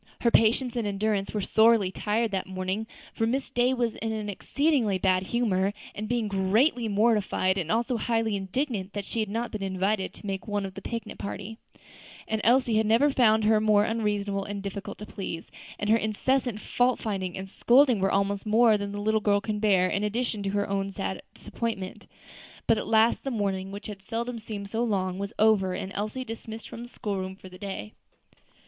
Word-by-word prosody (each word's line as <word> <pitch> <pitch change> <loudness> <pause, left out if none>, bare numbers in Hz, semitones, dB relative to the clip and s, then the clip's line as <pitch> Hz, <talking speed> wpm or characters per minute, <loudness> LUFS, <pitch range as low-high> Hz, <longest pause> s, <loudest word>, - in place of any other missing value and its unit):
Her 235 - +3
patience 235 +3 +3
and 230 -3 -1
endurance 200 0 -1
were 210 - -2
sorely 220 -3 +4
tried 220 +3 0
that 190 -1 -2
morning, 190 +3 -3 0.3
for 225 - 0
Miss 265 +4 -1
Day 245 +1 +2
was 240 -3 0
in 225 0 -4
an 215 -1 -3
exceedingly 250 - +1
bad 185 0 +2
humor, 200 -2 0 0.3
being 235 -2 0
greatly 220 +6 +2
mortified 205 -3 +2
and 175 -4 -2
also 235 +2 +1
highly 225 -2 0
indignant 200 0 -2
that 205 -1 -4
she 230 - -3
had 215 -2 -1
not 230 +3 -2
been 215 - -5
invited 190 +1 0
to - - -12
make 195 0 -4
one 205 -1 -1
of 190 - -6
the 195 - -8
picnic 230 -1 -5
party; 205 +3 -6 0.7
and 220 0 -1
Elsie 240 -1 +4
had 220 0 +2
never 235 +7 +4
found 220 -4 +4
her 215 0 +4
more 210 -1 +4
unreasonable 205 -3 -1
and 200 0 -5
difficult 200 0 -6
to 210 - -8
please; 175 -5 -6 0.3
and 205 - -3
her 225 - +6
incessant 230 +2 0
fault 245 +3 +1
finding 190 -4 -3
and 190 0 -5
scolding 245 +3 +4
were 195 0 +1
almost 200 0 +1
more 220 0 +4
than 200 0 -4
the 205 - -4
little 220 +1 +1
girl 205 -1 +3
could 210 0 -3
bear 190 -4 +4
in 200 +2 -1
addition 220 0 -1
to 200 - -2
her 205 +1 0
own 195 0 -1
sad 195 -1 -4
disappointment. 205 -5 -5 0.6
But 225 - +3
at - - -5
last 225 +1 +3
the 275 - -2
morning, 195 -5 -2
which 200 +1 -8
had 205 -2 -7
seldom 230 +4 -4
seemed 210 -2 -6
so 230 +1 0
long, 190 -4 -1
was 200 +1 -3
over, 205 -4 +3
and 190 +1 -5
Elsie 215 +6 -3
dismissed 225 -1 -7
from 230 - -8
the 240 - -8
school 205 -5 -4
room 190 0 -5
for 190 -1 -13
the 185 0 -13
day. 190 - -6
210 Hz, 200 wpm, -27 LUFS, 195-230 Hz, 0.7 s, her